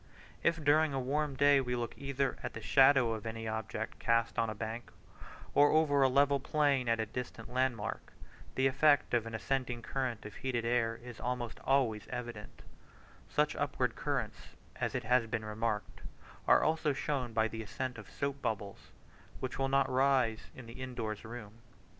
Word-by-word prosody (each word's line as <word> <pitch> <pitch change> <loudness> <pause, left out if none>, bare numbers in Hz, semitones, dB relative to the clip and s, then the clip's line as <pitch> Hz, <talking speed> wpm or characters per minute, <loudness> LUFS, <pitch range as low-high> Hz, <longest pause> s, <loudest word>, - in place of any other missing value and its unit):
If 165 -2 +1
during 150 0 +4
a - - 0
warm 140 +2 -1
day 140 0 +5
we 125 -1 -2
look 120 -1 -3
either 140 -1 -1
at 125 - -5
the - - -6
shadow 130 +1 +5
of 110 0 -5
any 115 0 -5
object 110 0 -4
cast 115 0 +1
on 115 - +1
a 110 - -4
bank, 115 +3 -5 0.6
or 145 +1 +6
over 150 -3 +3
a 135 - +5
level 140 +1 +4
plain 140 -3 +1
at 115 0 +2
a 110 - 0
distant 115 +1 -7
landmark, 125 -4 -1 0.4
the 130 - +2
effect 140 +2 +4
of 115 -2 +2
an 115 - -5
ascending 125 0 -2
current 125 -4 -3
of 105 - -7
heated 120 -3 -2
air 115 -1 +1
is 120 -2 -9
almost 120 -1 -3
always 125 -6 +1
evident: 120 -4 -7 0.7
such - - +1
upward - - -1
currents, - - -3 0.3
it 130 - -1
has 120 0 +3
been 110 -1 -3
remarked, 105 0 -3 0.5
are - - +6
also 155 -2 +1
shown 135 -3 -2
by 110 0 +2
the 110 0 -6
ascent 125 +3 -4
of 105 - -11
soap 140 -1 -3
bubbles, 105 -4 -4 0.5
which 130 0 -4
will 135 0 +1
not 135 0 +3
rise 130 -4 +2
in 125 -3 -10
an 115 - -10
in 130 -1 -6
doors 110 -3 -4
room. 115 -1 -9
125 Hz, 175 wpm, -33 LUFS, 115-135 Hz, 0.7 s, or